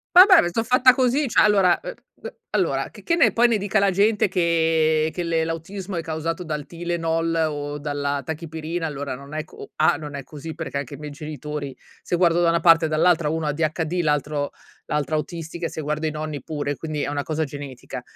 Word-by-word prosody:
Vabbè, 370 0 +9
ma - - 0
so' 225 +6 0
fatta 255 +2 +5
così! 265 +2 +2
Cioè, 225 - +4
allora, 195 -4 +4
ehm, - - -7 0.3
ehm, - - -5 0.2
allora, - - 0
che - - -15
che 335 - +1
ne 335 - +5
poi, 240 +1 +5
ne 230 - +2
dica 205 +2 0
la 200 -1 +3
gente, 205 +3 +3
che 160 -3 +2
che 180 - -3
le 165 -1 0
l'autismo 180 +4 -5
è 170 - -1
causato 165 +2 -3
dal 150 -3 -4
Tylenol, 165 -1 -1
o 145 0 -4
dalla 145 -1 -2
Tachipirina, 160 +1 -4
allora, 140 -2 -4
non 140 +3 -10
è 155 - -2
co - - -12
A 155 - +3
non 150 -2 -7
è 140 - -5
così, 155 +3 -8
perché, 160 -3 -4
anche 140 0 -5
i - - -12
miei 150 -1 -7
genitori, 150 -2 -6 0.3
se - - -2
guardo 175 -1 +3
da 170 - +4
una 170 0 +2
parte, 165 -1 +6
e - - +1
dall'altra, 160 0 +2
uno 160 0 -2
ADHD, 160 +3 -1
l'altro 150 -2 -1 0.4
l'altra 150 +1 -1
autistica, 165 +2 -4
e - - -8
se 160 - -6
guardo 150 +2 -2
i 155 - -1
nonni, 155 -2 -5
pure, 145 -2 -3
quindi, 155 -2 -3
è - - -2
una 145 -1 -2
cosa 160 0 -1
genetica. 140 -3 -7
160 Hz, 215 wpm, -23 LUFS, 150-175 Hz, 0.4 s, Vabbè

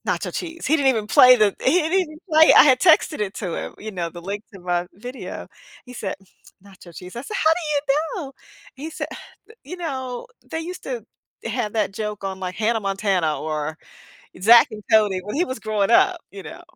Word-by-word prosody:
nacho - - -2
cheese." 335 -1 -5
He 300 - +3
didn't 280 -3 +2
even 225 -5 +1
play 250 +3 +7
the 210 -3 +3
he 260 - +4
didn't 320 +2 -3
even 310 -4 -6
play 315 -1 +6
it, - - +6
I - - +10
had 260 -3 +4
texted 315 -5 +4
it 205 -2 -2
to 180 -6 -4
him, - - -6
you 215 +1 -7
know, 175 -3 -3
the 175 - -10
link 200 +3 -5
to - - -10
my 175 0 -1
video. 245 +6 -8 0.4
He 250 - -12
said, 205 -5 -5 0.5
"Nacho 190 -3 -15
Cheese," 180 +4 -10
I 240 - -5
said, 415 - -5
"How 315 - +3
do 300 -4 -1 0.2
you 365 - -4
know?" 270 - -10 0.4
He 285 +4 -7
said, - - -5
"Eh - - -10 0.4
you 360 - -8
know, 260 -7 -5 0.2
they 320 - -3
used 360 +3 -7
to - - -5 0.4
have 210 - -2
that 210 -3 0
joke 210 0 -5
on, 190 -1 -4
like, 185 -1 -4
Hannah 225 +1 +1
Montana 195 -5 0
or 155 0 -3 0.7
Zack 230 +4 +7
and 210 -1 -9
Cody," 210 -4 +4
when 210 +5 -6
he 350 - +2
was 260 - -5
growing 215 -3 -1
up, 365 +9 +4
you 195 -1 -10
know? - - -10
220 Hz, 220 wpm, -22 LUFS, 195-295 Hz, 0.7 s, I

